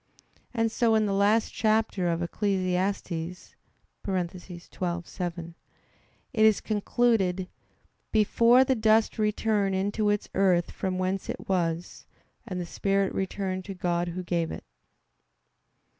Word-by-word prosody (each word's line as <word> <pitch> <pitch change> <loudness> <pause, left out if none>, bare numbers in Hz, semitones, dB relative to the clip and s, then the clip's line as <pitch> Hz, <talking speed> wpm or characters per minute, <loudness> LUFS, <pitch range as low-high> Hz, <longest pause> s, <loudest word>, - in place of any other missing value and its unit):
And 225 -2 0
so 230 -1 +2
in 215 -1 +3
the 200 - 0
last 205 +3 +2
chapter 215 -4 +1
of 170 0 0
Ecclesiastes 185 -2 -2 0.5
(12:7) 175 -1 -4 0.8
it 220 - +3
is 220 -2 +5
concluded: 205 -4 +1 0.6
"(Before) 230 +4 +5
the 265 - +2
dust 220 -1 +2
return 210 -2 +1
into 205 +2 0
its 205 0 0
earth 180 -3 +2
from 185 -1 -3
whence 185 +1 -2
it - - -5
was; 175 -2 -2 0.4
and 185 -1 -4
the 175 - -3
spirit 195 +2 0
return 190 -1 -2
to 195 +1 -8
God 175 -1 -1
Who 180 +2 -4
gave 170 -2 -1
it." - - -7
195 Hz, 120 wpm, -27 LUFS, 180-215 Hz, 0.8 s, is